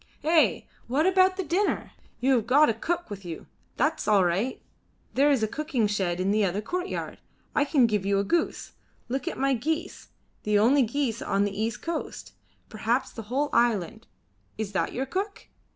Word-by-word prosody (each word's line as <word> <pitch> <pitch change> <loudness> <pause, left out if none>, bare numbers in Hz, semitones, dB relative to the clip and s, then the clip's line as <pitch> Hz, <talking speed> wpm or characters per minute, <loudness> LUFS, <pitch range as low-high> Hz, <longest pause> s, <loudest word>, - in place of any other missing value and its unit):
"Eh! 320 0 +3 0.3
what 275 +7 +1
about 375 0 +4
the 380 - -1
dinner? 370 +4 0 0.3
You 265 +2 +3
have 225 -1 -2
got 290 +4 +5
a - - -2
cook 335 +6 -3
with 200 -1 -7
you. 170 -3 -7 0.3
That's 305 -3 0
all 200 -3 +4
right. 195 +9 0 0.5
There 280 +2 +4
is 270 -6 +2
a - - +2
cooking 285 -2 -1
shed 190 -4 -1
in 190 +2 +1
the 215 0 +2
other 195 +1 0
courtyard. 360 - -4 0.3
I 285 - +2
can 275 -4 +4
give 210 -4 0
you 200 0 +1
a 200 - +2
goose. 335 +10 -1 0.4
Look 265 +1 -3
at - - -3
my 275 +1 +2
geese 310 +7 -3 0.3
the 210 0 +2
only 250 +7 +5
geese 240 -1 -1
on 200 0 +1
the 205 -1 -2
east 220 +1 -3
coast 335 -1 -5 0.3
perhaps 235 +4 -1
on - - -23
the 220 -2 -8
whole 285 +4 0
island. 220 -3 +1 0.5
Is 220 -2 -3
that 195 - -1
your 265 - -2
cook? 390 +8 -4
240 Hz, 190 wpm, -27 LUFS, 210-305 Hz, 0.5 s, got